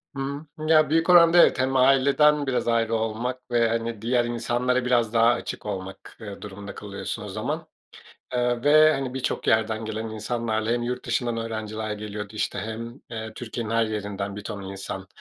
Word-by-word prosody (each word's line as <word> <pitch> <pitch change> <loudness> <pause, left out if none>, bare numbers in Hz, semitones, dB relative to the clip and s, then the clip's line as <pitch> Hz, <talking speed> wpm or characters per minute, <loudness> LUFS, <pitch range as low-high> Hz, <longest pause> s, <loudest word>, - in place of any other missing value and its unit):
Hı, 140 +2 -4 0.2
ya, 155 -1 +5
büyük 165 +3 +2
oranda, 170 -1 +7
evet. 170 - +6
Hem 130 +1 +1
aileden 140 +3 +4
biraz 125 -2 0
ayrı 115 -1 +2
olmak 115 +3 -3
ve, 120 -1 +3
hani, 115 -1 -2
diğer 120 +1 +1
insanlara 120 +2 0
biraz 120 -3 +2
daha 115 0 +5
açık 120 - -4
olmak, 95 -2 -7
eee, 100 -2 -8
durumunda 100 0 -8
kalıyorsun 100 -2 -6
o - - -7
zaman. - - -4 0.7
Eee, 120 -1 0
ve, 155 +1 +7
hani, 135 -3 -3
birçok 130 -1 -2
yerden 110 0 +2
gelen 110 +1 -4
insanlarla 110 0 -2
hem 120 0 +1
yurt 125 +1 -3
dışından 120 0 -1
öğrenciler 110 -1 -4
geliyordu, 105 0 -6
işte, 105 - -2
hem, 115 +5 -6
eee, 110 -1 -6
Türkiye'nin 115 -1 -5
her 115 0 +3
yerinden 100 -2 -4
bir 105 - -7
ton 100 -1 -6
insan, 95 0 -6
115 Hz, 175 wpm, -25 LUFS, 110-125 Hz, 0.7 s, oranda